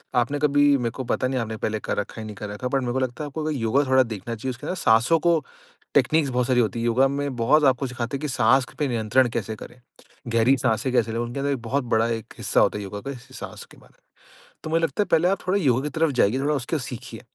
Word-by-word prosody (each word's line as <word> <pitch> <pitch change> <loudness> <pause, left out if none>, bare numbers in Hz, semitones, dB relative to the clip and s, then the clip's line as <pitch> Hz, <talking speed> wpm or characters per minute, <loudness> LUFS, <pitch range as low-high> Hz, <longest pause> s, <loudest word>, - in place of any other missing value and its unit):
आपने 130 +4 +1
कभी 145 0 +3
मेरे 120 -3 -2
को 130 - -6
पता 130 +1 0
नहीं 130 0 -1
आपने 110 -1 -4
पहले 110 0 -2
कर - - -3
रखा 105 - -3
है 110 - -6
या - - -6
नहीं 105 -1 -8
कर 105 0 -6
रखा 105 +5 -7
है 125 - 0
बट 135 0 +1
मेरे 120 -1 -2
को 130 - 0
लगता 130 +2 -3
है - - -4
आप 145 - -12 0.2
योगा 130 +2 +1
थोड़ा 130 0 +4
देखना 115 -1 -5
चाहिए 130 +4 -4
उसके 125 +4 -9
अंदर 185 - -2
साँसों 120 +2 +3
को 170 0 +3 0.5
टेक्निक्स 155 -3 +3
बहुत 125 -1 0
सारी 125 -1 +3
होती 115 0 0
है। 115 - -2
योगा 125 +3 +4
में 140 -1 -3
बहुत 135 +6 +3
आपको 130 0 +2
सिखाते 125 +1 -4
हैं 135 - -12
कि 150 - -2
साँस 125 0 +3
पे 145 - +1
नियंत्रण 120 +2 +2
कैसे 110 -2 -3
करें, 120 +3 -12 0.5
गहरी 115 +3 +3
साँसें 115 +1 0
कैसे 115 -2 +2
लें, 115 - -2
उनके 120 +3 -3
अंदर 140 +1 0
एक 135 - -1
बहुत 130 +4 -1
बड़ा 115 -1 +1
एक 115 -2 -4
हिस्सा - - +1
होता - - +3
है 105 - -5
योगा 100 +1 -6
का 140 +4 -5
इस 130 0 -11
साँस - - -8
के - - -16
बारे - - -20
में। - - -36 0.5
तो - - -5
मुझे 165 +1 +1
लगता 165 +5 0
है - - +2
पहले 165 +2 +4
आप 195 - +1
थोड़ा 195 +2 +2
योगा 130 -2 +3
की 150 - -2
तरफ 160 +1 +1
जाइए, 125 -1 +2
थोड़ा 145 +2 +1
उसके 145 +3 -2
सीखिए। 125 -2 -8
125 Hz, 280 wpm, -24 LUFS, 115-140 Hz, 0.5 s, थोड़ा